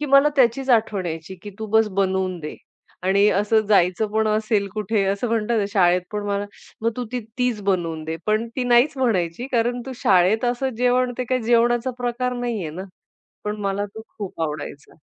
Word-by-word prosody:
की 295 - -2
मला 275 +2 +6
त्याचीच 265 +1 +3
आठवण 215 -5 +2
यायची 165 +3 -5
की 205 - -7
"तू 220 - -4
बस 220 +1 +3
बनवून 190 -1 0
दे" 150 - -6 0.5
आणि 200 +3 +4
असं 210 +3 +2
जायचं 185 +1 +3
पण 220 0 +2
असेल 215 -1 +1
कुठे 215 0 0
असं 200 +5 -1
म्हणतात 225 -1 0
शाळेत 180 -2 +3
पण 210 - -2
मला 200 0 -1 0.4
मग 230 - +2
"तू 250 - -2 0.3
तीच 250 -4 0
बनवून 170 -5 -1
दे." 160 +1 -3
पण 215 +2 +1
ती 255 - 0
नाहीच 245 +4 +4
म्हणायची 210 -3 0
कारण 240 +1 +1
तू 265 - -5
शाळेत 190 +4 +3
असं 245 +2 0
जेवण 250 0 +2
ते 255 - -1
काय 255 +1 0
जेवणाचा 240 +2 +2
प्रकार 250 +1 -1
नाहीये 230 -9 -3
ना. 180 +4 -6 0.6
पण 210 0 -2
मला 200 0 -1
तो 220 - -8 0.2
खूप 195 -5 -6
आवडायचा 150 -2 -5
215 Hz, 185 wpm, -22 LUFS, 190-240 Hz, 0.6 s, मला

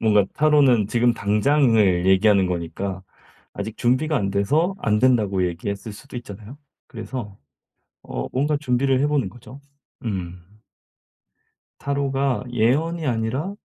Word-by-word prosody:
뭔가 105 -3 +4
타로는 140 -7 +4
지금 120 0 +2
당장을 105 -4 +2
얘기하는 95 0 +4
거니까 90 +2 -4 0.5
아직 105 +2 -6
준비가 130 +6 +1
안 100 -4 -1
돼서 150 - +1
안 105 -1 +1
된다고 105 -7 +2
얘기했을 100 +5 -5
수도 130 +4 -11
있잖아요. 110 +3 -9 0.3
그래서 110 -3 -7 0.7
어 - - -5
뭔가 145 +3 0
준비를 130 -1 +1
해 145 - +2
보는 140 -10 0
거죠. 125 +6 -13 0.4
음. 90 -1 -6 1.2
타로가 140 -2 -1
예언이 150 +8 +1
아니라 125 - -2
115 Hz, 275 characters per minute, -22 LUFS, 100-135 Hz, 1.2 s, 뭔가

